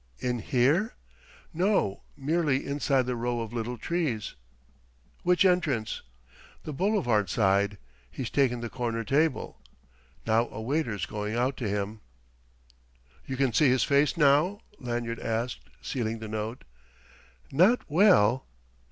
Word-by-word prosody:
"In 125 - -2
here?" 140 - +1 0.6
"No 175 - +1 0.2
merely 145 -1 0
inside 140 -2 +1
the 125 0 -2
row 120 0 -2
of 115 0 -5
little 120 +1 -3
trees." 145 -7 -2 0.9
"Which 180 +2 +3
entrance?" 155 - +1 0.6
"The 155 - -5
boulevard 135 - +1
side. 100 +1 +2 0.3
He's 110 - -5
taken 125 -4 +2
the 120 - -4
corner 115 -2 -2
table. 150 +8 0 0.6
Now 115 +1 +2
a - - -8
waiter's 115 -3 -1
going 105 +1 -4
out 125 +3 +1
to 115 -5 -2
him." 105 +1 -3 1.3
"You 130 - -4
can 135 -3 +1
see 145 +4 +5
his 130 0 +3
face 145 +4 +2
now?" 155 +7 +3 0.2
Lanyard 120 -2 -3
asked, 115 - -3 0.2
sealing 115 -3 -2
the 110 0 -7
note. 110 +2 -4 0.9
"Not 185 - +4
well...." 145 - +4
125 Hz, 125 wpm, -28 LUFS, 110-150 Hz, 1.3 s, see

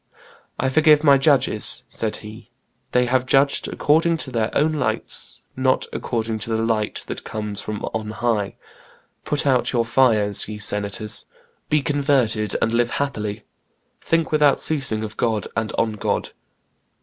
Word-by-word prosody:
"I - - +1
forgive 150 +1 +5
my 140 -2 +6
judges," 135 -6 +2
said 110 -1 -2
he; 110 +1 -11 0.4
"they 125 0 +3
have 130 +1 +1
judged 140 +1 +3
according 165 +3 +2
to 130 - -9
their 115 -2 0
own 155 +2 +2
lights, 150 - -3
not 130 0 +1
according 110 -2 -2
to 115 - -7
the 110 0 0
light 110 -2 -1
that - - -6
comes 105 -2 -4
from 105 -1 -5
on 110 -1 -3
high. 110 -2 -1 0.7
Put 145 -1 -1
out 130 -3 +2
your 120 -2 +1
fires, 110 -5 +3
ye 105 - -5
senators; 105 0 -1 0.4
be 150 -2 +2
converted, 130 -7 +1
and 115 - +1
live 120 0 +2
happily. 105 -7 -3 0.6
Think 165 -1 0
without 150 -2 +4
ceasing 135 -8 0
of 105 -1 -7
God 110 -3 0
and 110 0 -1
on 115 -1 +1
God." 105 - -2
115 Hz, 150 wpm, -22 LUFS, 110-140 Hz, 0.7 s, my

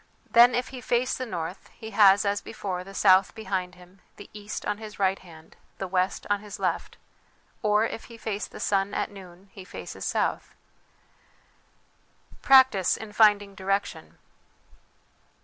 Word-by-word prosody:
Then 240 +1 +7
if 245 +1 -2
he 255 -2 -9
face 245 +2 0
the 255 - -5
north, 175 -1 -6
he 220 -1 -9
has, 200 -1 +5
as 200 0 0
before, 185 -5 -5
the 195 +1 -12
south 190 -1 +4
behind 185 -5 -4
him, 180 +1 -19
the 205 - -13
east 210 0 -7
on 210 0 -2
his 215 -1 -10
right 195 -1 +1
hand, 160 -3 -16 0.2
the 190 - -4
west 185 +1 -1
on 205 0 +1
his 210 0 -9
left; - - -3 0.6
or 210 -1 +2
if 230 - -6
he 235 - -13
face 215 -2 -4
the - - -12
sun 195 0 0
at - - -2
noon, 190 -1 -14
he 190 - -10
faces 185 - -9
south. - - -2 1.9
Practice 260 -9 +5
in 220 -1 -9
finding 205 -2 +4
Direction. 195 +1 -3
200 Hz, 155 wpm, -26 LUFS, 190-220 Hz, 1.9 s, Then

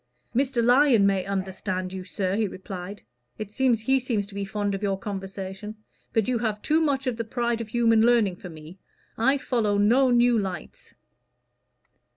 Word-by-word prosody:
"Mr. 255 -1 +1
Lyon 245 -3 +5
may 195 -2 +2
understand 190 -1 -3
you, 190 -1 -5
sir," 185 +2 -2
he 215 0 +1
replied. 190 +1 -8 0.3
"He 215 - -4 0.5
seems 235 -5 -1
to 200 - -15
be 200 0 -3
fond 205 0 -2
of 195 - -4
your 195 -2 0
conversation. 195 +1 -6 0.4
But 225 -2 +1
you 250 -2 0
have 220 -2 -1
too 315 +1 +2
much 280 -3 0
of 250 -3 -1
the 230 - -2
pride 235 +1 -2
of 225 - -6
human 230 0 +3
learning 225 -6 +3
for 180 - -9
me. 160 +3 -12 0.4
I 265 +5 +2
follow 225 -6 0
no 240 +6 +4
new 240 -1 +4
lights." 185 -5 -7
210 Hz, 170 wpm, -25 LUFS, 195-240 Hz, 0.5 s, Lyon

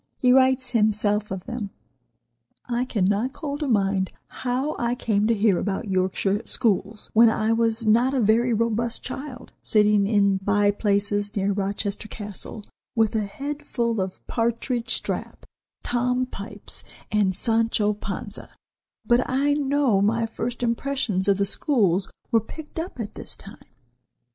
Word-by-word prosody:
He 250 -1 +4
writes 260 -1 +4
himself 210 -2 +1
of 190 -1 -5
them: 235 -5 -4 1.0
"I 245 0 -1
cannot 210 +2 0
call 290 -2 -5
to 300 - -2
mind 195 -5 +1
how 255 +4 -2
I 240 0 0
came 215 -3 +1
to 230 - +3
hear 205 -3 +3
about 205 +2 -2
Yorkshire 190 +2 +1
schools, 210 -2 -1
when 230 +1 +7
I 220 0 +1
was 230 0 +1
not 235 +4 +4
a - - +2
very 230 +2 +3
robust 230 +1 0
child, 265 -3 -7
sitting 210 -2 +3
in 200 -2 +3
by 205 +1 +2
places 205 0 0
near 200 0 +1
Rochester 200 +1 -2
Castle 210 0 -8 0.3
with 225 -1 +2
a 215 -2 +1
head 285 +7 -5
full 235 -4 -1
of 185 0 -5
Partridge, 235 +1 -1
Strap, - - -3 0.4
Tom 250 +1 0
Pipes 225 -3 -8 0.3
and 200 -3 +2
Sancho 225 0 +2
Panza, 205 0 -7 0.6
but 240 0 +4
I 275 +3 +2
know 280 -7 +2
my 225 +3 +2
first 240 +2 -4
impressions 235 -5 -1
of 200 -1 +4
the 200 - +1
schools 195 - +2 0.2
were 225 -2 +4
picked 315 +7 -9
up 330 -5 -6
at 215 -3 -4
this - - -8
time." 195 - -13
220 Hz, 150 wpm, -24 LUFS, 205-245 Hz, 1.0 s, when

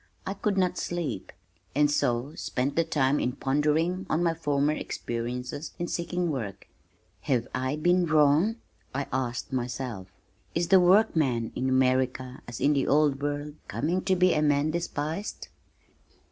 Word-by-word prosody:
I 195 - -2
could 200 0 -1
not 180 -1 +1
sleep, 150 - -3 0.4
and 145 0 +4
so 125 0 0
spent 135 0 -2
the 165 - +3
time 145 -3 +1
in 125 - 0
pondering 155 +8 0
on 160 +3 +1
my 165 -1 +2
former 145 -2 +1
experiences 125 +3 -4
in 175 - -3
seeking 175 0 -1
work. 100 -8 -5 0.5
"Have 120 -4 0
I 130 +2 -1
been 175 +3 +2
wrong?" 155 +7 +4 0.4
I 140 0 -1
asked 130 0 -2
myself. 120 -5 -3 0.5
"Is 170 +1 0
the 190 - +7
workman 160 - +3
in 130 - 0
America, 130 0 +1
as 120 -1 -6
in 145 - +3
the 140 -2 +1
old 145 -1 +3
world, 145 +1 -2
coming 175 +6 -1
to 190 - +3
be 180 0 +4
a 150 - +1
man 145 0 +2
despised?" 165 +3 -4
145 Hz, 150 wpm, -27 LUFS, 130-170 Hz, 0.5 s, the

